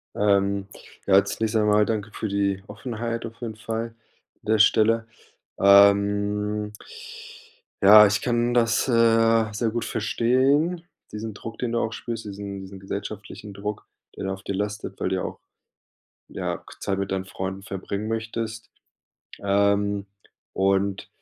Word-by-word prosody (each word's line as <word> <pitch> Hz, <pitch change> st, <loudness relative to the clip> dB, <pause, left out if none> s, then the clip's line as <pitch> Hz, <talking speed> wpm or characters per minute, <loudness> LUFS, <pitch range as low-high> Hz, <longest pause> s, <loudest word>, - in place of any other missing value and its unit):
Ähm, 100 Hz, -1 st, +2 dB, 0.4 s
ja 95 Hz, -, +3 dB
als 100 Hz, 0 st, +3 dB
nächstes 110 Hz, 0 st, +1 dB
einmal, 105 Hz, 0 st, +3 dB
danke 105 Hz, -1 st, -2 dB
für 110 Hz, -, -4 dB
die 100 Hz, -1 st, 0 dB
Offenheit 115 Hz, +1 st, -5 dB
auf 115 Hz, +1 st, -11 dB
jeden 115 Hz, -2 st, -5 dB
Fall 115 Hz, 0 st, -3 dB
an 115 Hz, -, -14 dB, 0.5 s
der 110 Hz, 0 st, +1 dB
Stelle. 110 Hz, +1 st, +4 dB, 0.5 s
Ähm. 100 Hz, +1 st, +4 dB, 1.1 s
Ja, 105 Hz, +2 st, +10 dB
ich 100 Hz, +2 st, +1 dB
kann 120 Hz, -1 st, 0 dB
das, 115 Hz, +1 st, +2 dB
äh, 115 Hz, -2 st, +4 dB
sehr 115 Hz, 0 st, 0 dB
gut 120 Hz, +1 st, -3 dB
verstehen, 135 Hz, +10 st, +1 dB, 0.3 s
diesen 110 Hz, +1 st, -5 dB
Druck, 115 Hz, +3 st, -8 dB
den 120 Hz, -2 st, -2 dB
du 115 Hz, -, +1 dB
auch 115 Hz, -, -1 dB
spürst, 115 Hz, -2 st, -6 dB
diesen 100 Hz, -1 st, -6 dB
diesen 95 Hz, 0 st, -10 dB
gesellschaftlichen 100 Hz, +1 st, -7 dB
Druck, 105 Hz, +1 st, -5 dB, 0.3 s
der -, -, -6 dB
da 95 Hz, 0 st, -2 dB
auf 95 Hz, -, -12 dB
dir 100 Hz, -, -4 dB
lastet, 105 Hz, +1 st, -4 dB
weil -, -, 0 dB
du -, -, -1 dB
ja -, -, -2 dB
auch, -, -, -6 dB, 0.9 s
ja, -, -, -4 dB
k -, -, -15 dB
Zeit 100 Hz, -1 st, -1 dB
mit 100 Hz, -, -2 dB
deinen 95 Hz, -1 st, -1 dB
Freunden 95 Hz, 0 st, -6 dB
verbringen 100 Hz, +2 st, -5 dB
möchtest. 115 Hz, 0 st, -4 dB, 0.7 s
Ähm, 100 Hz, 0 st, +1 dB, 0.5 s
und, 95 Hz, 0 st, 0 dB
105 Hz, 150 wpm, -24 LUFS, 100-115 Hz, 1.1 s, Ja